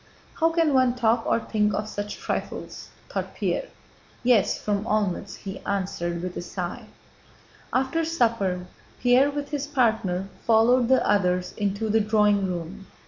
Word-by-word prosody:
"How 325 0 +4
can 330 -3 +2
one 255 -2 +3
talk 230 -1 +1
or - - +3
think 210 -2 0
of 210 - -2
such 205 -1 -5
trifles?" - - -5 0.2
thought - - -4
Pierre. - - -1 0.6
"Yes, 240 -5 +3
from 205 -1 -1
Olmütz," 205 -3 -1
he 195 -1 -7
answered, 175 -3 -3
with 180 -1 -4
a - - -3
sigh. 175 0 -5 0.9
After 265 +6 +1
supper 230 - 0 0.3
Pierre 255 +3 +4
with 285 0 -4
his 285 -1 -2
partner 220 -9 +1 0.2
followed 235 +2 +4
the 260 +1 +3
others 180 -3 +1
into 205 +2 -1
the 220 +1 +3
drawing 210 -2 +3
room. 180 +3 -6
215 Hz, 145 wpm, -25 LUFS, 195-250 Hz, 0.9 s, How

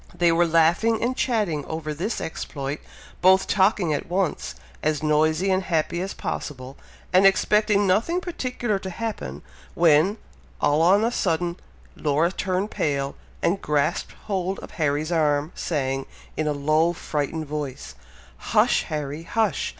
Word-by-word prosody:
They 175 -1 +3
were 170 +1 +3
laughing 170 +8 +3
and 250 +2 0
chatting 210 - 0
over 160 -1 -4
this 190 +9 -3
exploit, 145 -3 -5 0.4
both 190 +1 +5
talking 190 -4 +2
at 145 - -3
once, 185 -1 -1 0.3
as 155 -1 0
noisy 155 +5 +2
and 185 0 +2
happy 170 -1 -1
as 195 +1 -4
possible, 130 -1 -5 0.4
and 185 +1 +6
expecting 210 +1 +3
nothing 225 - +2
particular 250 - -2
to 190 - -6
happen, 185 - -5 0.3
when, 170 +5 +4 0.4
all 145 +2 +2
on 190 +5 +5
a 230 - +1
sudden, 170 -4 0 0.4
Laura 155 +3 +1
turned 190 +2 -2
pale, 140 -2 -1 0.3
and 195 +3 +1
grasped 145 -1 0
hold 190 -2 -1
of - - -10
Harry's 150 0 -1
arm, 150 -1 +1
saying, 135 -4 -2 0.3
in 155 - -1
a - - +2
low 155 +4 +2
frightened 155 -1 -3
voice, 145 -3 -5 0.4
"Hush, - - +2
Harry! 150 0 -4
hush! 210 +3 0
165 Hz, 140 wpm, -24 LUFS, 150-195 Hz, 0.4 s, and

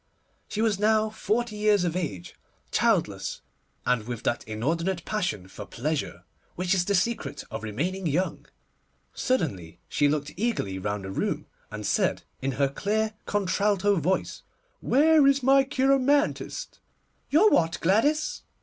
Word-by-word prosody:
She 215 - -2
was 210 -4 +1
now 215 0 +3
forty 220 +1 -1
years 210 -2 +3
of 170 -1 -1
age, 140 - -4 0.4
childless, - - 0 0.4
and 120 -3 +1
with 120 -2 -5
that 120 - 0
inordinate 165 - -2
passion 180 - -2
for 100 +2 -9
pleasure 135 - -3 0.3
which 180 +1 0
is 180 -2 +1
the 200 - +1
secret 200 -6 -1
of - - -4
remaining 170 - -2
young. 175 +6 -1 0.7
Suddenly 120 - -2
she 145 -1 +2
looked 145 0 -2
eagerly 170 - -1
round 100 0 -3
the 95 - -5
room, - - -2 0.2
and 105 0 -6
said, - - +1 0.2
in 135 0 -1
her 140 +1 +2
clear 215 +9 -1
contralto 200 0 +1
voice, 180 +4 -1 0.4
'Where 300 +1 +5
is 275 -1 +3
my 270 +1 +6
cheiromantist?' 275 - +1 0.5
'Your 370 +9 +5
what, 165 0 +2
Gladys? 285 - +1
185 Hz, 140 wpm, -26 LUFS, 135-220 Hz, 0.7 s, my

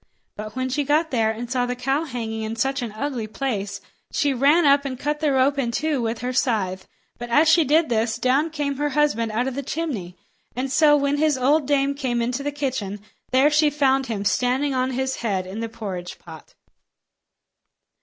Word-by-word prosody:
But 215 +2 -7
when 260 0 -2
she 285 +3 0
got 305 +3 +1
there 225 -4 +2
and 225 +2 -4
saw 250 -1 0
the 250 - -2
cow 270 +5 -1
hanging 225 -5 -4
in 220 +1 -4
such 270 +4 -1
an 235 -3 -4
ugly 240 -1 -3
place, 205 -5 -3 0.3
she 285 -2 +1
ran 290 +6 +4
up 280 0 +5
and 265 -2 -4
cut 295 +1 -2
the 300 -2 +1
rope 275 +1 +2
in 245 -3 0
two 295 +2 -1
with 225 0 -2
her 250 +1 -2
scythe. 195 -8 -1 0.3
But 240 0 -6
as 295 +7 +4
she 325 +1 +6
did 310 +3 +3
this, 225 0 0
down 260 +6 +2
came 290 -3 -3
her 295 +1 0
husband 230 -7 +2
out 240 +4 0
of 265 - -2
the 280 - -3
chimney; 255 - -4 0.4
and 260 +2 -3
so 295 0 +5
when 280 0 0
his 305 -2 +2
old 280 +3 +2
dame 280 -1 +2
came 260 -4 -2
inside 250 +4 -2
the 290 - 0
kitchen, 260 -8 -3 0.3
there 270 +4 +4
she 300 0 +4
found 270 -2 +1
him 205 -3 -3
standing 255 +7 +1
on 255 0 0
his 265 +1 -2
head 195 -5 -2
in 190 +4 -7
the 230 0 -3
porridge 190 -6 -6
pot. 160 -2 -13
260 Hz, 205 wpm, -23 LUFS, 230-290 Hz, 0.4 s, she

